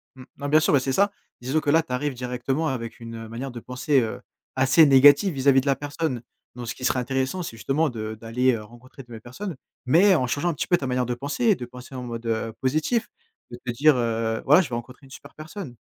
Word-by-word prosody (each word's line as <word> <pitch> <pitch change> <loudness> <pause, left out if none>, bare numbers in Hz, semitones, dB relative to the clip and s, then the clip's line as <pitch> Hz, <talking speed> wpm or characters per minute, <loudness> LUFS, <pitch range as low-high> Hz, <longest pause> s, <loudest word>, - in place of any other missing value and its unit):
Mmh, 130 - -12
bah, 145 - -4
bien 155 +2 +5
sûr, 155 - +1
bah, 140 - +5
c'est 135 +1 -2
ça! 200 +9 +2 0.3
Disons 130 +5 0
que 150 - -2
là, 165 +2 +5
tu 160 - -13
arrives 145 +2 -1
directement 125 +5 -2
avec 120 -5 -4
une 115 -1 -8
manière 120 +5 -6
de 120 - -7
penser, 125 +4 0
heu, 110 -2 -4 0.3
assez 135 +5 +5
négative 145 +7 +6
vis-à-vis 135 -1 +4
de - - -11
la 140 -1 +2
personne, 145 -2 -3 0.3
donc 120 -1 -7
ce - - -4
qui 125 - -6
serait 130 - +2
intéressant, 130 +7 -2
c'est 135 -9 -7
justement 135 - 0
de 110 -3 -5
d'aller, 125 +3 +1
heu, 110 -2 -4
rencontrer 120 +5 -14
de - - -29
nouvelles 115 -2 -9
personnes, 165 - -7 0.3
mais 185 +9 +5
en 130 -6 +1
changeant 145 +8 -1
un - - 0
petit - - -4
peu 175 - +3
ta 140 - -5
manière 125 0 0
de 125 - -2
penser, 145 - -3
et 215 -3 +5
de 125 - -7
penser 125 +2 -12
en 125 - -5
mode, 115 -1 -6
heu, 115 0 -2
positif, 155 - 0 0.4
de 120 - -7
te 120 - -1
dire, 145 +5 +4
heu: 115 -1 -1
«Voilà 150 +6 +6
je 175 - -5
vais 120 - -3
rencontrer 125 +4 -8
une - - -21
super - - -12
personne». 155 -3 -9
130 Hz, 255 wpm, -24 LUFS, 120-150 Hz, 0.4 s, négative